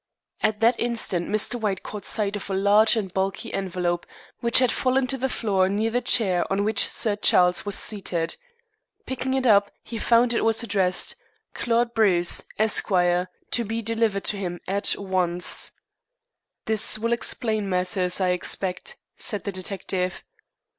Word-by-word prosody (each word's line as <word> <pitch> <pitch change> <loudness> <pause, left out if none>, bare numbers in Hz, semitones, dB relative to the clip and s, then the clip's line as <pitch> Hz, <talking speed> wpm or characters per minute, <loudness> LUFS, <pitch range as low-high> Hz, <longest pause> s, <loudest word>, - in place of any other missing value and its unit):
At 215 0 -1
that 230 +1 +3
instant 230 -7 -1
Mr. 215 +3 +1
White 200 -4 -2
caught 210 -2 -8
sight 205 -1 0
of 200 - -7
a 195 - -2
large 205 +4 +4
and 195 -5 -4
bulky 190 0 -3
envelope, 180 -2 -3 0.3
which 235 0 +3
had 255 -1 +4
fallen 260 0 0
to 255 - -4
the 265 +2 -1
floor 195 -6 0
near 215 +3 -1
the 245 +2 0
chair 195 -7 +3
on 195 +1 0
which 215 0 +3
Sir 215 -3 -2
Charles 180 -2 +3
was 205 - +1
seated. 180 -6 0 0.7
Picking 260 0 -3
it 265 -1 -1
up, 205 -3 +4
he 230 - -7
found 235 +1 +3
it - - 0
was 225 +1 +1
addressed, 190 -5 +1 0.4
"Claude 235 0 0
Bruce, 185 -6 +2 0.2
Esq. 215 0 +1
To 180 +4 0
be 225 +1 -4
delivered 225 -2 -1
to 205 - 0
him 175 -3 -5
at 200 +2 +2
once." 180 -3 0 0.9
"This 215 0 +2
will 230 +2 -1
explain 220 -3 -2
matters, 180 0 0
I 185 -1 +1
expect," 185 - -1 0.2
said 205 - -2
the 200 - -4
detective. 185 -1 -3
205 Hz, 160 wpm, -23 LUFS, 185-230 Hz, 0.9 s, large